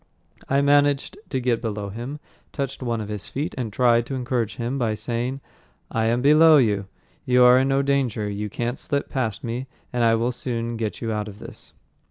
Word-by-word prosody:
I 140 +1 +3
managed 145 +2 +3
to 130 - -1
get 120 -2 0
below 105 -3 -3
him, 120 +8 -6 0.3
touched 135 -2 -4
one 120 -3 -1
of 105 - -5
his 105 -2 -6
feet, 145 +4 -3
and 120 -4 -3
tried 120 +1 +3
to 135 - -3
encourage 120 -3 -2
him 125 +3 -3
by 110 -3 0
saying, 120 +5 -3 0.5
"I 115 -1 0
am 120 +2 +1
below 155 +2 +7
you. 105 -7 +2 0.4
You 125 0 +4
are 125 +1 +7
in 135 - +2
no 135 0 +2
danger. 135 -6 0
You 105 +1 -4
can't 120 +4 -3
slip 140 -1 -2
past 115 -6 -2
me 120 +3 -4 0.3
and 120 -1 +1
I 115 0 +5
will 115 +2 0
soon 120 -1 -3
get 110 -2 -4
you 115 - -1
out 105 -1 -2
of 100 -1 -9
this." - - -12
120 Hz, 205 wpm, -23 LUFS, 115-135 Hz, 0.5 s, below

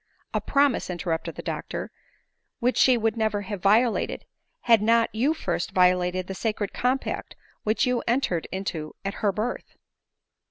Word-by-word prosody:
" - - -40
A - - 0
promise," 280 -7 +2
interrupted 170 -2 -3
the - - -7
doctor, - - -4 0.3
" - - -52
which 250 +1 +1
she 255 -2 +5
would 225 -1 0
never 215 -2 0
have 200 -1 -5
violated, 220 +4 +2 0.4
had 230 -3 +5
not 230 +1 +3
you 265 +9 +1
first 175 - -3
violated 180 0 +3
that 190 - -5
sacred 210 0 -2
compact 255 +2 -1 0.3
which 215 +1 +1
you 250 -1 +1
entered 235 -9 0
into 170 -5 -4
at 195 - -1
her 205 - +3
birth." 215 +5 -4
215 Hz, 160 wpm, -25 LUFS, 185-240 Hz, 0.4 s, she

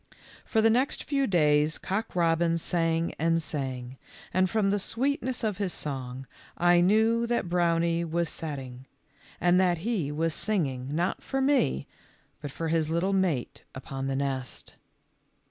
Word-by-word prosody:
For 220 -2 +1
the 225 - +5
next 255 +5 +1
few 275 -2 0
days 150 -3 +3
Cock 195 +2 -3
robin 165 -1 +2
sang 165 0 0
and 165 +1 +2
sang, 130 -4 -4 0.3
and 185 0 +3
from 200 0 +1
the 205 - +1
sweet 275 - 0
ness 255 -1 -3
of 210 -3 -1
his 190 -4 -1
song 130 -2 -5 0.3
I 175 0 +5
knew 220 +5 +3
that 235 -6 0
Brownie 170 -1 +2
was 170 +1 -1
set 155 -1 -4
ting, 130 -1 -9 0.5
and 175 +1 +4
that 180 -2 +2
he 195 -12 -1
was 160 +2 0
singing, 140 -13 -1
not 175 +5 -1
for 270 - -3
me, 265 - +2 0.6
but 145 - -5
for 165 +4 -4
his 160 -1 +1
little 170 +4 0
mate 180 -10 0
upon 135 +1 -5
the 135 - -1
nest. 135 -2 -3
170 Hz, 160 wpm, -28 LUFS, 145-195 Hz, 0.6 s, the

